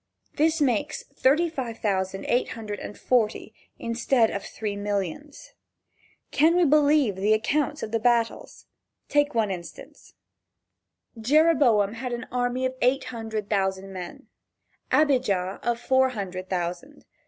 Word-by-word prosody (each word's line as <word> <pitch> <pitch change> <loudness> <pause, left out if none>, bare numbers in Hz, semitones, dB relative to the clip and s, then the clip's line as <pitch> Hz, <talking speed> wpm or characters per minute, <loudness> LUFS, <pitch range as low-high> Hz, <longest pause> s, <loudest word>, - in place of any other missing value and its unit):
This 320 +2 +2
makes 290 +2 0
thirty 290 +6 +3
five 255 -8 -5
thousand 195 -2 -2
eight 245 - 0
hundred 215 -2 -6
and 205 - -8
forty, 220 -3 0 0.3
(35,840.) 230 - -6
instead 235 0 +2
of 200 - -4
three 210 -2 -5
millions. 205 - -4 0.8
Can 320 +3 +4
we 355 -1 +4
believe 290 -6 +4
the 205 +3 +2
accounts 295 +6 -1
of 215 - -5
the 225 - 0
battles? 235 0 0 0.4
Take 290 -1 +2
one 215 -3 +1
instance: 170 -3 -10 1.0
Jereboam 255 -6 +3
had 245 +2 -5
an 240 +1 -4
army 250 +1 -1
of 260 - -1
eight 265 +2 +2
hundred 220 -2 -4
thousand 195 -1 -1
men, 180 -2 -8 0.7
Abijah 210 -11 +2
of 235 -1 -1
four 260 +1 +3
hundred 190 -5 -6
thousand. 180 +10 -4
230 Hz, 135 wpm, -25 LUFS, 205-275 Hz, 1.0 s, Can